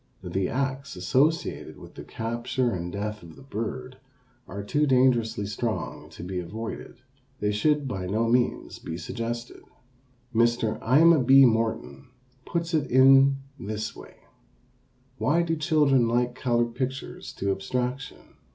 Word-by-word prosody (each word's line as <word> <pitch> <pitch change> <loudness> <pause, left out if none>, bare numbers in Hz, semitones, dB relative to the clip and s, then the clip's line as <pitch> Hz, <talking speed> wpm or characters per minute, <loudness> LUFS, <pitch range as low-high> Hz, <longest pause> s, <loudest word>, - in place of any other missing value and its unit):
The 95 -1 -2
acts 135 +1 -3
associated 130 - 0
with - - -13
the - - -9
capture 120 +2 -2
and 90 -2 -4
death 105 +2 -4
of 85 -2 -13
the - - -14
bird 125 +2 -5 0.5
are 100 0 -6
too 150 +8 +1
dangerously 120 -5 +2
strong 110 +3 -4
to - - -10
be 90 0 -4
avoided. 110 +7 -7 0.4
They 105 - 0
should 145 +7 +1
by 95 -7 -4
no 110 +4 0
means 120 +1 0
be 80 - -6
suggested. 120 +2 -5 0.7
Mr. 115 -1 +1
Aima 155 +4 +5
B. 135 +2 +7
Morton 115 +3 -1 0.4
puts 170 0 -2
it 150 -4 +1
in 135 +1 +6 0.2
this 110 +1 -4
way: - - -13 1.0
Why 165 +5 +2
do 165 -1 -1
children 145 -5 +3
like 120 +1 +1
colored 120 -2 0
pictures 130 +2 -5
to 100 0 -1
abstraction? 125 +7 -4
120 Hz, 135 wpm, -26 LUFS, 110-135 Hz, 1.0 s, B